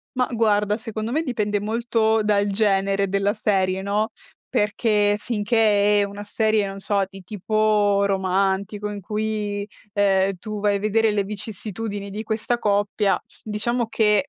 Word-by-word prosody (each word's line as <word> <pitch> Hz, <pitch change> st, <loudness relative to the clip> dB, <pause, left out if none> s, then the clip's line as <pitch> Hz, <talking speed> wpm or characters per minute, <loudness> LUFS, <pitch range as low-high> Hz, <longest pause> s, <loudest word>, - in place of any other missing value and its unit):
Ma 250 Hz, 0 st, +1 dB
guarda, 210 Hz, -2 st, +2 dB
secondo 220 Hz, 0 st, -5 dB
me 305 Hz, +5 st, +1 dB
dipende 210 Hz, -8 st, -1 dB
molto 220 Hz, +1 st, +1 dB
dal 205 Hz, -1 st, +2 dB
genere 195 Hz, -1 st, +1 dB
della 200 Hz, +1 st, +1 dB
serie, 190 Hz, -3 st, 0 dB
no, 210 Hz, +2 st, 0 dB, 0.4 s
perché 210 Hz, -1 st, +2 dB
finché 210 Hz, -2 st, +2 dB
è -, -, +3 dB
una 200 Hz, +1 st, -6 dB
serie, 215 Hz, 0 st, +1 dB
non 195 Hz, 0 st, -6 dB
so, 200 Hz, 0 st, +1 dB
di 195 Hz, 0 st, -12 dB
tipo 205 Hz, +1 st, +1 dB
romantico 195 Hz, +2 st, 0 dB
in 205 Hz, -1 st, -6 dB
cui, 210 Hz, 0 st, -3 dB, 0.3 s
ehm, 195 Hz, -1 st, +2 dB
tu 215 Hz, +2 st, -5 dB
vai 205 Hz, -1 st, +2 dB
a -, -, -6 dB
vedere 215 Hz, +1 st, +2 dB
le 205 Hz, -1 st, +1 dB
vicissitudini 205 Hz, 0 st, -5 dB
di 210 Hz, +2 st, -5 dB
questa 225 Hz, +2 st, -1 dB
coppia, 205 Hz, -1 st, +1 dB, 0.2 s
diciamo 230 Hz, +3 st, -1 dB
che, 215 Hz, +2 st, +2 dB
210 Hz, 145 wpm, -23 LUFS, 200-220 Hz, 0.4 s, è